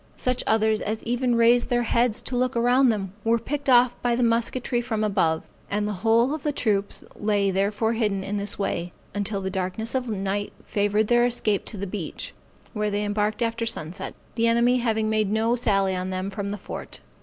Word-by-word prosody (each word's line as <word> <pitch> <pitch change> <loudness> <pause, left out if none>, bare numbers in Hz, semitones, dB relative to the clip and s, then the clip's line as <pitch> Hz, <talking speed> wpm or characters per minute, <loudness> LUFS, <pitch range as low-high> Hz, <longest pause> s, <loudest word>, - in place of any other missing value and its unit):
Such 255 0 0
others 220 0 +2
as 220 +1 -3
even 245 +1 +1
raised 235 +1 +4
their 240 -1 +2
heads 235 -1 +1
to 255 - -4
look 255 +1 0
around 250 +2 +4
them, 195 -4 -2
were 230 +1 +3
picked 285 +4 -3
off 245 -1 +5
by 240 -1 +1
the 245 - +1
musketry 235 +1 +1
from 220 -2 -2
above; 180 -6 +1 0.2
and 205 +1 0
the 210 - -2
whole 230 +5 +3
of 310 - -4
the 300 - 0
troops 205 -7 0
lay 205 -2 +1
therefore 205 +4 +1
hidden 210 -4 0
in 205 +2 -3
this 200 0 -3
way, 175 -3 -2 0.2
until 205 0 -2
the 190 0 -3
darkness 190 +4 -2
of 255 -1 -1
the 220 - -2
night 195 +1 -2
favored 205 +1 +1
their 240 +2 +4
escape 215 -4 +1
to 215 - -5
the 200 - -3
beach, 185 -4 -5 0.4
where 210 -2 -1
they 205 0 -1
embarked 210 +3 0
after 230 0 -1
sunset, 180 -5 -4 0.2
the 230 0 +1
enemy 235 +2 +4
having 220 -3 0
made 215 -2 +1
no 225 +2 +2
sally 195 -5 +1
on 185 0 -3
them 185 +1 -3
from 200 0 -4
the 205 - -3
fort. - - -7
220 Hz, 205 wpm, -25 LUFS, 200-240 Hz, 0.4 s, off